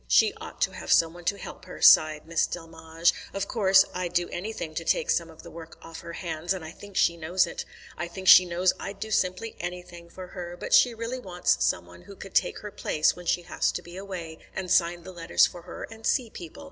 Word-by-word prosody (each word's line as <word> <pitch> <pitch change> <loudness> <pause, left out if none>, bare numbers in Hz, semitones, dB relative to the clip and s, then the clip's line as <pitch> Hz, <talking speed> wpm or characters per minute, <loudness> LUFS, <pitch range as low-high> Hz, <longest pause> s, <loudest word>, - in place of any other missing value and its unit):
"She - - +4
ought - - -9
to - - +2
have - - -6
some 165 -1 +4
one 175 0 -13
to 200 - 0
help - - -10
her," 185 - -10
sighed 155 -1 +6
Miss 165 0 +1
Delmege. 165 0 -1 0.2
"Of 195 0 -2
course, 195 -4 +5
I'd 180 -1 -3
do 175 0 +1
anything 175 -4 -5
to 165 - -4
take - - +1
some 170 -1 0
of 160 - -14
the - - -11
work 165 -1 -11
off 165 0 -9
her 170 - -9
hands, 170 +1 -3
and 175 -4 -7
I 160 - -8
think 200 +2 -11
she 170 - +3
knows 170 +3 +1
it. 170 - -6 0.3
I 170 - -2
think 190 +2 -8
she 185 - +10
knows 180 +1 +1
I'd 195 0 -7
do 220 +1 -5
simply 185 +3 -1
anything 175 -1 -7
for 185 +1 -10
her; 175 -1 -7
but - - -4
she 245 -2 +6
really 230 +3 -4
wants 180 -6 0
some - - 0
one 90 0 -15
who 200 - -13
could 195 - -11
take - - +1
her 210 - -7
place 155 -4 +1
when 180 -1 -11
she 175 - +1
has - - 0
to - - -5
be 175 0 -11
away, 180 -5 -7 0.2
and 185 -2 -4
sign 170 -1 +2
the 185 - -9
letters 170 -1 +3
for 175 - -7
her, - - -9
and 225 0 -12
see 235 0 +1
people. 170 - -10
175 Hz, 245 wpm, -27 LUFS, 165-190 Hz, 0.3 s, she